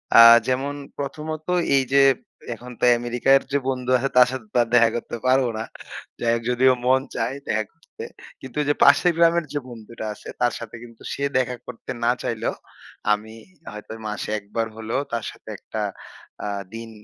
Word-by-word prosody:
আ -, -, +9 dB, 0.3 s
যেমন 135 Hz, +2 st, 0 dB, 0.2 s
প্রথমত 155 Hz, +2 st, -5 dB, 0.3 s
এই 135 Hz, -, +4 dB
যে 140 Hz, -, +7 dB, 0.5 s
এখন 125 Hz, +2 st, -10 dB
তো -, -, -8 dB
অ্যামেরিকার 120 Hz, +3 st, +3 dB
যে 140 Hz, -, +3 dB
বন্ধু 125 Hz, -1 st, -3 dB
আছে 135 Hz, +2 st, -1 dB
তার 125 Hz, -, +8 dB
সাথে 130 Hz, -4 st, -6 dB, 0.3 s
দেখা 115 Hz, -2 st, +6 dB
করতে 120 Hz, 0 st, -4 dB
পারব 130 Hz, +1 st, +4 dB
না। 110 Hz, -, -2 dB, 0.6 s
যাই 115 Hz, -, +1 dB
হোক 115 Hz, -, -3 dB
যদিও 130 Hz, +1 st, +4 dB
মন 130 Hz, +1 st, +4 dB
চায় 130 Hz, -, -1 dB
দেখা 110 Hz, +1 st, +1 dB
করতে। -, -, -13 dB, 0.4 s
কিন্তু 130 Hz, 0 st, -10 dB
ওই -, -, -1 dB
যে 145 Hz, -, +3 dB
পাশের 145 Hz, +5 st, +6 dB
গ্রামের 170 Hz, -1 st, +4 dB
যে 145 Hz, -, 0 dB
বন্ধুটা 115 Hz, -1 st, -9 dB
আছে। -, -, -14 dB
তার 120 Hz, -1 st, +3 dB
সাথে 115 Hz, -1 st, -8 dB
কিন্তু 115 Hz, -1 st, -14 dB
সে 140 Hz, -, -4 dB
দেখা 125 Hz, -1 st, 0 dB
করতে 125 Hz, +1 st, -7 dB
না 120 Hz, -, +4 dB
চাইলেও, 115 Hz, -1 st, -2 dB, 0.6 s
আমি 110 Hz, +1 st, -5 dB, 0.4 s
হয়তো 105 Hz, 0 st, -10 dB, 0.2 s
মাসে 105 Hz, 0 st, -4 dB
১ 100 Hz, -, -8 dB
বার 115 Hz, 0 st, +1 dB
হলেও 115 Hz, +5 st, -2 dB
তার 115 Hz, -2 st, -2 dB
সাথে -, -, -15 dB
একটা -, -, -6 dB, 0.6 s
আ -, -, -2 dB, 0.3 s
দিন 115 Hz, 0 st, -7 dB
125 Hz, 180 wpm, -23 LUFS, 115-135 Hz, 0.6 s, আ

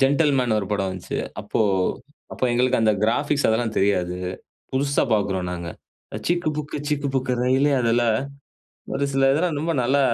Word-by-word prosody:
Gentleman 135 Hz, -4 st, +3 dB
ஒரு 100 Hz, -, -3 dB
படம் 100 Hz, -2 st, 0 dB
வந்துச்சு. 95 Hz, -1 st, -5 dB, 0.2 s
அப்போ -, -, -2 dB, 0.7 s
அப்போ -, -, -2 dB
எங்களுக்கு 125 Hz, +1 st, +2 dB
அந்த 110 Hz, -1 st, +4 dB
கிராஃபிக்ஸ் 145 Hz, +6 st, +1 dB
அதெல்லாம் 110 Hz, 0 st, 0 dB
தெரியாது. 90 Hz, -3 st, +1 dB, 0.6 s
புதுசா 140 Hz, +1 st, +1 dB
பாக்குறோம் 95 Hz, -3 st, -1 dB
நாங்க. 85 Hz, -1 st, -5 dB, 0.6 s
சிக்கு 175 Hz, -1 st, +1 dB
புக்கு 150 Hz, 0 st, -4 dB
சிக்கு 145 Hz, -2 st, -1 dB
புக்கு 130 Hz, -1 st, 0 dB
ரெயிலே 130 Hz, +3 st, +3 dB
அதில 120 Hz, 0 st, +2 dB, 0.9 s
ஒரு 140 Hz, -, 0 dB
சில 135 Hz, 0 st, +4 dB
இதெல்லாம் 160 Hz, +1 st, 0 dB
ரொம்ப 165 Hz, +2 st, -1 dB
நல்லா 135 Hz, +4 st, +2 dB
130 Hz, 150 wpm, -23 LUFS, 105-145 Hz, 0.9 s, அந்த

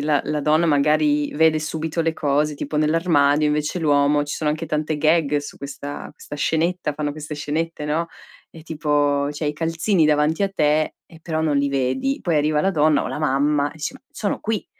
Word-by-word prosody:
ehm -, -, -3 dB
la 150 Hz, -2 st, +2 dB
la 150 Hz, -1 st, -2 dB
donna 155 Hz, +3 st, +2 dB
magari 150 Hz, 0 st, +2 dB
vede 160 Hz, +1 st, +4 dB
subito 160 Hz, +1 st, -3 dB
le 165 Hz, 0 st, 0 dB
cose 150 Hz, 0 st, 0 dB
tipo 145 Hz, +1 st, -5 dB
nell'armadio, 150 Hz, -2 st, +3 dB
invece 150 Hz, +3 st, -1 dB
l'uomo, 145 Hz, -1 st, +2 dB
ci 145 Hz, -, -4 dB
sono 150 Hz, -1 st, 0 dB
anche 155 Hz, +2 st, -3 dB
tante 155 Hz, 0 st, -1 dB
gag 155 Hz, -1 st, +2 dB
su 145 Hz, -, -8 dB
questa 140 Hz, +1 st, -7 dB
questa 145 Hz, 0 st, -10 dB
scenetta, 160 Hz, +1 st, 0 dB
fanno 145 Hz, 0 st, -2 dB
queste 150 Hz, 0 st, -7 dB
scenette, 150 Hz, +2 st, -3 dB
no. 155 Hz, +3 st, -1 dB, 0.4 s
Ehm 165 Hz, -, -13 dB
tipo, 145 Hz, -2 st, 0 dB
cioè 150 Hz, +1 st, -4 dB
i 150 Hz, -, 0 dB
calzini 165 Hz, +3 st, +1 dB
davanti 150 Hz, +4 st, +2 dB
a 195 Hz, -, +1 dB
te 155 Hz, -2 st, +1 dB
e 165 Hz, -, -16 dB
però 160 Hz, -2 st, -2 dB
non 155 Hz, -2 st, +1 dB
li 140 Hz, 0 st, +1 dB
vedi. 135 Hz, -, -1 dB
Poi 170 Hz, -5 st, +1 dB
arriva 150 Hz, 0 st, +2 dB
la 195 Hz, -, +2 dB
donna 155 Hz, -3 st, +3 dB
o -, -, -4 dB
la -, -, -4 dB
mamma 145 Hz, 0 st, +1 dB
e -, -, -16 dB
dice: 155 Hz, -, -4 dB
"Ma 270 Hz, -, -14 dB
sono 205 Hz, -, -3 dB
qui." 220 Hz, -2 st, -2 dB
150 Hz, 205 wpm, -22 LUFS, 145-160 Hz, 0.4 s, vede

